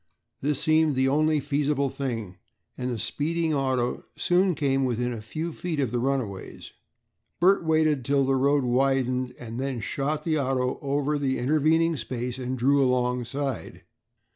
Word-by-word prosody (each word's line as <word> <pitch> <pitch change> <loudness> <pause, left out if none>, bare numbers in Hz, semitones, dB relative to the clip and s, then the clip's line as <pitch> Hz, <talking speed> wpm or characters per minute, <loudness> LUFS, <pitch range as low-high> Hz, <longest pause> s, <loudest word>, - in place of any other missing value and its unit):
This 145 0 0
seemed 155 -2 +3
the 130 +1 +2
only 155 +2 +2
feasible 140 -1 0
thing 115 -9 -4 0.4
and 125 0 -3
the 120 - -2
speeding 155 +8 -1
auto 130 -3 0
soon 180 0 +2
came 135 -2 +1
within 125 -1 -1
a 115 - -6
few 155 +9 -5
feet 165 -3 -3
of 130 -5 0
the 120 - 0
runaways. 125 -7 -3 0.7
Bert 185 +2 +4
waited 155 -4 +2
till 140 +2 +2
the 135 - +2
road 140 +1 +2
widened 130 0 +1
and 115 0 -7
then 135 -2 -2
shot 145 +6 -2
the 155 -2 +1
auto 130 -2 0
over 145 +1 0
the 135 -2 0
intervening 155 +4 +2
space 125 +1 -4
and 130 0 -3
drew 140 +3 +3
alongside. 125 - -1
135 Hz, 155 wpm, -26 LUFS, 125-150 Hz, 0.7 s, Bert